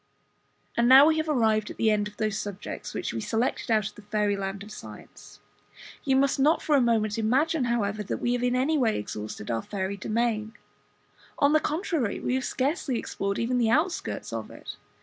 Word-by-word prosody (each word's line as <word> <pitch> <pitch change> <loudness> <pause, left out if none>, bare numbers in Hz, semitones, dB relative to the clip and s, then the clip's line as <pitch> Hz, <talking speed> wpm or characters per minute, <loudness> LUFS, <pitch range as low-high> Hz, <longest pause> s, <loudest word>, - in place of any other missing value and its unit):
And 235 +1 +3
now 265 +2 +10
we 315 0 +3
have 315 0 -1
arrived 220 -6 +2
at - - -9
the 220 -1 +3
end 210 -1 +1
of 210 - -13
those 215 -2 -1
subjects 205 -2 -6
which - - -3
we 115 - -3
selected 230 - -1
out 215 -2 +2
of - - -19
the - - -13
Fairy 210 0 0
land 195 0 -4
of 210 - -12
Science. - - -12 0.6
You 270 -1 +2
must 275 +1 +2
not 300 +4 +4
for 300 - +1
a 275 - +5
moment 225 -2 +1
imagine, 265 +6 +2
however, 215 -3 -1
that 205 - -3
we 240 - 0
have 245 - -1
in 250 0 +1
any 285 +5 +2
way 230 -4 +2
exhausted 105 +1 -5
our 115 -1 -1
fairy 195 - -4
domain; 220 +1 -1 0.8
on 285 +1 +3
the 310 - +5
contrary, 310 - -1
we - - -2
have 260 0 0
scarcely 270 -1 -1
explored 200 -2 -3
even 245 +2 0
the 230 -2 +2
outskirts 320 +9 -1
of - - -4
it. - - -9
230 Hz, 205 wpm, -27 LUFS, 210-270 Hz, 0.8 s, now